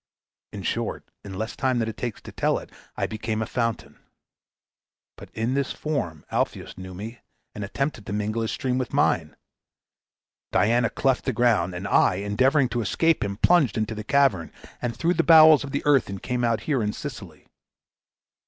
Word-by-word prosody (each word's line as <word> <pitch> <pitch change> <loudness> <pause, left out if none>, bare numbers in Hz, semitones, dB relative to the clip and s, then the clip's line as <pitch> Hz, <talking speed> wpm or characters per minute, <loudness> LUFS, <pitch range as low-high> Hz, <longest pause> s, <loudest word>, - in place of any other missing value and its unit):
In - - -7
short, - - -3
in 95 -2 -8
less 110 +2 -4
time 130 -2 0
than 115 -2 0
it 110 - -5
takes 120 -4 -5
to - - -9
tell - - 0
it - - -9 0.3
I - - 0
became 110 0 -3
a 110 - -1
fountain. 115 -2 -3 1.2
But - - -12
in 115 +3 -1
this 140 0 -1
form 90 - -3
Alpheus - - -2
knew 95 -1 -9
me 110 +5 -8 0.3
and 105 - -6
attempted 125 +2 -3
to - - -5
mingle 105 +2 -1
his 110 - -2
stream 130 -1 -1
with 125 - -4
mine. - - +1 1.2
Diana 120 +3 +3
cleft 135 -2 0
the 130 - 0
ground, 105 -7 +2
and 95 +3 -4
I, 95 - +4
endeavoring 130 +8 +2
to 120 - -1
escape 165 - +1
him, 100 -1 -3
plunged 165 -3 +3
into 110 0 -1
the 110 0 -6
cavern, 130 - +2 0.3
and 120 -2 -3
through 170 +6 +1
the 165 - +1
bowels 155 -3 +8
of 140 - -6
the 140 +1 -3
earth 140 -7 +3
came 125 -1 -2
out 115 -2 +1
here 140 -5 0
in 105 -1 -1
Sicily. - - -8
115 Hz, 180 wpm, -25 LUFS, 105-135 Hz, 1.2 s, bowels